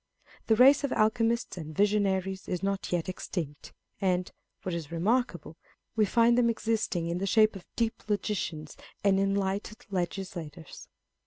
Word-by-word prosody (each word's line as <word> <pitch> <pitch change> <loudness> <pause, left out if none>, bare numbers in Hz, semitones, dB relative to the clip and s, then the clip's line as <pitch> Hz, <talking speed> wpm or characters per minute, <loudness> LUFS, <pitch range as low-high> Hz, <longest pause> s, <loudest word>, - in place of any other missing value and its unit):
The 220 - +5
race 270 +5 +7
of 280 - -1
alchemists 230 0 +1
and 155 -1 -7
visionaries 195 -2 +1
is 180 -1 -3
not 195 0 -2
yet 175 -2 0
extinct; 165 -5 -5 0.3
and, 185 -2 0 0.3
what 185 - -3
is 165 -2 -5
remarkable, 175 - 0 0.4
we 215 -2 +4
find 235 +3 +4
them 235 -1 +4
existing 220 -7 -1
in 170 +1 -2
the 195 - -1
shape 215 +1 +4
of 190 - -10
deep 230 0 -1
logicians 185 -7 -2 0.3
and 195 -1 +4
enlightened 195 +3 -1
legislators. 175 -3 -5
195 Hz, 145 wpm, -29 LUFS, 175-220 Hz, 0.4 s, race